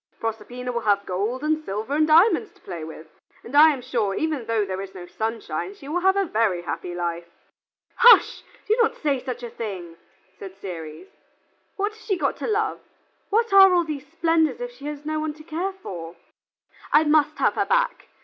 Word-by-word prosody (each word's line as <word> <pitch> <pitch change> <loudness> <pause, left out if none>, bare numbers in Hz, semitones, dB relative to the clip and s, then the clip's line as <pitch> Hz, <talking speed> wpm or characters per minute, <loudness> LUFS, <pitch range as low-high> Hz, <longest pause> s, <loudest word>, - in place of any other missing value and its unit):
Proserpina 245 +3 -4
will 235 -1 -2
have 200 -2 +1
gold 210 +9 -2
and 310 0 0
silver 215 +3 -4
and 310 0 +3
diamonds 380 +7 +4
to - - -26
play 170 -4 -7
with, 160 0 -9 0.4
and 245 - -8
I 310 +2 +8
am 265 -4 -5
sure 210 -6 -1
even 315 -2 -1
although 230 -3 -1
there 190 0 -4
is 195 -1 -9
no 180 -1 -8
sunshine, 225 - -4
she 280 -8 -13
will 325 +5 -1
have 380 +2 +3
a 395 - +2
very 215 - 0
happy 175 +3 -5
life." 170 -1 -3 0.7
"Hush! 475 0 +6 0.3
do 435 - +3
not 450 - +2
say 285 -4 0
such 250 -2 -5
a 240 - -5
thing," 180 -7 -6 0.4
said 195 -1 -9
Ceres. 165 - -8 0.7
"What 410 +1 -1
has 440 - -17
she 390 -4 -1
got - - 0
to - - -4
love? 430 -1 0 0.5
What 450 0 +1
are 385 -2 +8
all 350 - +3
these 295 -3 -6
splendors 325 +2 +1
if - - -5
she 285 -12 -13
has 295 0 -6
no 310 0 -2
one 305 -1 -3
to 305 - -14
care 340 +5 -3
for? 175 - -8 0.8
I 300 - +6
must 300 -1 +2
have - - +2
her - - -1
back. - - 0
280 Hz, 200 wpm, -24 LUFS, -, 0.8 s, I